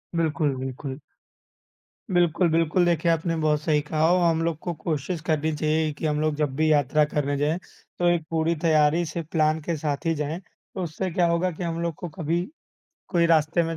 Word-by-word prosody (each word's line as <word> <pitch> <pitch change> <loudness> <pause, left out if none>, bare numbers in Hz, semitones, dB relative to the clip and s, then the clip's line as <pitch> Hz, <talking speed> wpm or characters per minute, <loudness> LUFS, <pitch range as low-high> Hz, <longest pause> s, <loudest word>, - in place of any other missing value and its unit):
बिल्कुल, 155 -3 +1
बिल्कुल। 130 +2 -5 1.1
बिल्कुल, 175 0 +3
बिल्कुल, 165 +2 +2
देखिए 170 0 +2
आपने 165 +1 0
बहुत 150 -1 +2
सही 150 -1 +2
कहा। 155 +1 +1 0.2
हम 165 0 +1
लोग 165 -2 -1
को 175 - -3
कोशिश 155 +1 -3
करनी 155 -1 +1
चाहिए 155 +1 +1
कि - - -4
हम 150 -1 0
लोग 155 -1 +1
जब 145 -3 -1
भी 155 +2 +2
यात्रा 150 +1 +3
करने 145 -1 -1
जाएँ, 150 +5 0 0.4
तो 175 - +2
एक 170 -2 +1
पूरी 165 0 +1
तैयारी 155 +1 +3
से 165 +1 -4
प्लान 155 -1 +2
के 170 +2 -2
साथ 145 -1 -3
ही 165 - +2
जाएँ। 150 +3 -3
तो 190 0 -10
उससे 175 +3 -3
क्या 175 +1 +2
होगा 170 +2 +1
कि 170 +2 -6
हम 165 -1 -2
लोग 170 -1 -1
को 175 - -5
कभी 165 +2 -1 0.7
कोई 170 -3 +3
रास्ते 165 +1 +3
में 165 0 -3
160 Hz, 195 wpm, -25 LUFS, 150-170 Hz, 1.1 s, बिल्कुल